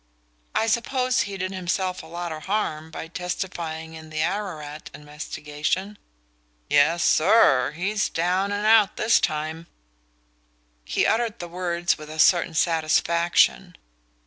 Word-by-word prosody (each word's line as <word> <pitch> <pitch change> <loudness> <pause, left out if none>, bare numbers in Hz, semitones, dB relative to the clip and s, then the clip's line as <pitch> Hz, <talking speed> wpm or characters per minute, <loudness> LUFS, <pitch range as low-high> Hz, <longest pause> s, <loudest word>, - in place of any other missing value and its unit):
"I - - +2
suppose 250 +3 +1
he 200 -1 -4
did 185 0 -3
himself 185 0 -2
a 160 - -13
lot 170 +1 -5
of 155 -1 -7
harm 160 -6 -2
by 160 - -7
testifying 165 -2 -5
in 160 0 -11
the 155 0 -1
Ararat 155 -8 -4
investigation?" 150 +6 -4 0.7
"Yes, 160 +4 +4
SIR 155 - +4
he's 200 +6 -1
down 185 +4 0
and 205 +1 -2
out 220 -2 +5
this 225 +2 +4
time." 155 +2 -3 1.2
He - - 0
uttered 230 0 +1
the 175 - -7
words 175 -1 -1
with 155 0 -10
a 155 - -8
certain 165 0 +4
satisfaction. 170 +3 +2
175 Hz, 130 wpm, -24 LUFS, 155-195 Hz, 1.2 s, out